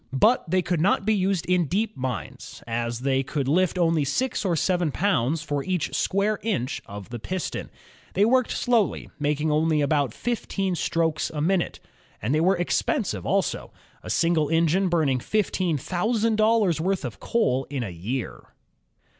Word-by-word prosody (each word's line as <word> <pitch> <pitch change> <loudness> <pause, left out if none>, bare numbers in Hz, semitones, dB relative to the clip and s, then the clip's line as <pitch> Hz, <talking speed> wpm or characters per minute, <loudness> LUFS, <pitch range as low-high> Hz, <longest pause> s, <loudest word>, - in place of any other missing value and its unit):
But 220 - +3
they 185 +1 +2
could 175 -3 0
not 195 +5 +2
be 220 - +3
used 190 -3 0
in 180 -3 +2
deep 215 +6 -1
mines, 130 -2 -6
as 120 0 -3
they 135 0 +1
could 135 0 -3
lift 180 +5 +2
only 165 -3 +2
six 225 - -1
or 180 -4 +1
seven 175 -1 +1
pounds 155 -4 +1
for 145 -2 -2
each 185 -4 -2
square 200 +2 +1
inch 135 - -2
of 100 0 -9
the 120 -1 -6
piston. 185 +9 -4 0.5
They 200 +3 +4
worked 255 +1 +3
slowly, 235 -6 0
making 150 +1 0
only 155 0 +2
about 145 -3 +1
fifteen 195 - -2
strokes 165 -2 0
a 150 - -5
minute, 175 +3 0 0.4
and 120 +7 -1
they 155 - +2
were 185 +2 +3
expensive 175 - -1
also, - - -1 0.3
a - - -9
single 165 -3 +2
engine 165 +4 +2
burning 150 -7 +2
fifteen 185 - 0
thou 180 - -1
sand 225 -1 +1
dollars' 215 -7 +3
worth 185 -3 0
of 120 - -6
coal 135 - +1
in 135 -3 -3
a 100 - -5
year. 90 - -4
165 Hz, 170 wpm, -25 LUFS, 140-195 Hz, 0.5 s, They